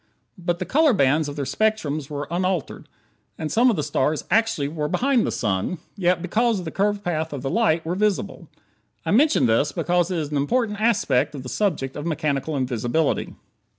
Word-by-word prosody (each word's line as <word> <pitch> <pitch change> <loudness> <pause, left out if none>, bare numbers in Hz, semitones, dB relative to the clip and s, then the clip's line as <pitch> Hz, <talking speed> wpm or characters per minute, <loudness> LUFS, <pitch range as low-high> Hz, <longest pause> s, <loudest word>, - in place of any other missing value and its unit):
But 175 0 -1
the - - -4
color 300 -1 +3
bands 145 -2 +2
of 145 - -7
their 145 -2 -3
spectrums 155 -8 -1
were 145 -1 -4
unaltered. 180 -2 -2 0.5
And 155 -1 -4
some 245 +3 +4
of 230 - +2
the 150 - -1
stars 150 +1 0
actually 225 -10 +2
were 150 0 -3
behind 260 - +1
the - - -1
sun, 105 - -1 0.2
yet 180 -3 +1
because 225 +5 +1
of 180 - -5
the 160 - -4
curved 205 +1 0
path 160 -2 -2
of 140 -3 -6
the 135 - -2
light, 190 -8 +2
were 165 - -1
visible. 205 +1 -1 0.6
I - - 0
mention 295 +9 +4
this 115 +6 +2
because 175 0 0
it 180 - -1
is 150 -2 -3
an 145 - 0
important 210 - 0
aspect 155 - +2
of 135 - -7
the 125 - -7
subject 150 -10 -1
of 150 +3 -4
mechanical 150 -1 -1
invisibility. 130 +4 -1
165 Hz, 195 wpm, -23 LUFS, 145-210 Hz, 0.6 s, some